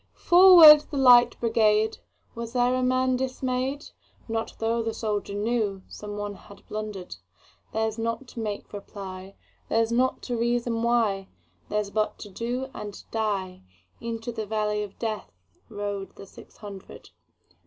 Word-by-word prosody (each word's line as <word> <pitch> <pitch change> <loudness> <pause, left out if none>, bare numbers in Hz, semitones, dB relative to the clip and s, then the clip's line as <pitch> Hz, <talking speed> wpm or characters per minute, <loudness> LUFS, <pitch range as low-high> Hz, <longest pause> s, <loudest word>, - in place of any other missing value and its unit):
"Forward, 345 -4 +9
the 290 - -4
Light 245 -2 +6
Brigade!"Was 225 +1 -1
there 245 0 +2
a 255 - 0
man 255 0 +2
dismay'd? 260 +2 -3 0.4
Not 225 -1 -3
tho' 230 +1 0
the 225 0 -3
soldier 210 -2 -3
knewSome 205 -2 -3
one 205 0 -4
had 200 0 -16
blunder'd:Theirs 210 - -6
not 230 +3 -3
to - - -9
make 210 -2 -5
reply, 195 -1 -8 0.3
Theirs 225 0 +1
not 255 +2 +1
to 245 - -3
reason 235 0 0
why, 225 -5 +1 0.4
Theirs 210 -1 -1
but 215 0 -1
to 205 - -10
do 245 +6 -4
and 205 -1 -8
die:Into 195 - -5
the 220 -2 -5
valley 210 0 -1
of 205 -2 -7
DeathRode 205 - -6
the 195 - -11
six - - -16
hundred. 200 -2 -11
220 Hz, 130 wpm, -26 LUFS, 205-240 Hz, 0.4 s, Forward